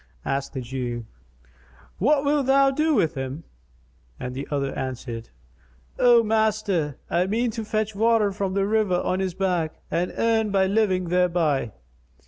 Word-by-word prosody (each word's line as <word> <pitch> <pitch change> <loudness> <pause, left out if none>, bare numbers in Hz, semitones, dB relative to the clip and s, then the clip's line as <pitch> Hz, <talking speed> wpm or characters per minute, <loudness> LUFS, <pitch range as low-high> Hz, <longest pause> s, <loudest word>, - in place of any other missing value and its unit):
Asked 135 0 -2
the 130 - -4
Jew, 120 -2 -4 0.9
"What 280 +6 +3
wilt 285 -2 +1
thou 275 0 +5
do 305 +2 +1
with 160 -9 +2
him?"; 135 +3 -5 0.8
and 125 - -5
the 135 +2 -5
other 140 -2 -1
answered, 120 -3 -5 0.7
"O 240 -1 +6
master, 215 -8 0
I 180 +2 +1
mean 230 +4 0
to 225 0 -5
fetch 215 0 -2
water 220 0 +3
from 195 -1 -3
the 195 -1 +2
river 205 -4 +1
on 185 - -1
his 190 -2 -2
back, 180 -5 -1 0.2
and 175 +2 0
earn 225 -1 +2
my 195 -1 +2
living 190 -3 +1
thereby." 170 - +1
190 Hz, 150 wpm, -24 LUFS, 150-220 Hz, 0.9 s, O